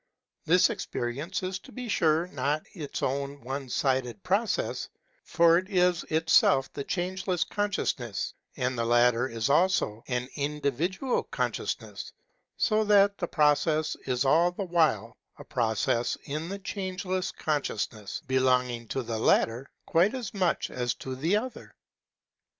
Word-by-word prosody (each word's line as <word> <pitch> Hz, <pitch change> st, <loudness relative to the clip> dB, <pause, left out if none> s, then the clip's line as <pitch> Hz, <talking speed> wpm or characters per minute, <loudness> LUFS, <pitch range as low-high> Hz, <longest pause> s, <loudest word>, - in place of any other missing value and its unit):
This -, -, +5 dB
experience 140 Hz, +11 st, -4 dB
is 185 Hz, 0 st, -3 dB
to -, -, -15 dB
be 250 Hz, -1 st, -6 dB
sure 165 Hz, -5 st, +2 dB
hot 145 Hz, -2 st, -1 dB
its 150 Hz, -7 st, -5 dB
own 140 Hz, +1 st, -2 dB
one 135 Hz, +1 st, -5 dB
sided 130 Hz, -2 st, 0 dB
process; 200 Hz, +4 st, 0 dB, 0.3 s
for 170 Hz, 0 st, +4 dB
it 185 Hz, +1 st, -9 dB
is 180 Hz, -3 st, +2 dB
itself 160 Hz, -4 st, +3 dB
the 140 Hz, -, -4 dB
Changeless 180 Hz, +1 st, -1 dB
Consciousness, 160 Hz, -, -2 dB, 0.2 s
and 125 Hz, +1 st, 0 dB
the 115 Hz, -, -1 dB
latter 120 Hz, +1 st, +3 dB
is 115 Hz, -1 st, -2 dB
also 145 Hz, -, +2 dB
an 125 Hz, -1 st, -1 dB
individual 150 Hz, -, -1 dB
consciousness; -, -, -3 dB, 0.5 s
so 215 Hz, -1 st, +2 dB
that 200 Hz, -1 st, +4 dB
the 175 Hz, -, -1 dB
process 155 Hz, 0 st, +2 dB
is 130 Hz, +1 st, 0 dB
all 165 Hz, +6 st, +4 dB
the 195 Hz, +2 st, -4 dB
while 155 Hz, -, +1 dB, 0.2 s
a -, -, -10 dB
process 115 Hz, 0 st, 0 dB
in 155 Hz, +4 st, -4 dB
the 200 Hz, -, -4 dB
Changeless 185 Hz, -1 st, -3 dB
Consciousness, 110 Hz, -8 st, -3 dB
belonging 125 Hz, -2 st, +1 dB
to 130 Hz, -, -2 dB
the 115 Hz, -1 st, -3 dB
latter 115 Hz, +3 st, +2 dB, 0.2 s
quite 185 Hz, +9 st, +3 dB
as 245 Hz, -6 st, -5 dB
much 185 Hz, -4 st, 0 dB
as 125 Hz, -1 st, -1 dB
to 130 Hz, -1 st, -6 dB
the 165 Hz, +10 st, +1 dB
other. 250 Hz, +4 st, -6 dB
150 Hz, 140 wpm, -28 LUFS, 125-185 Hz, 0.5 s, This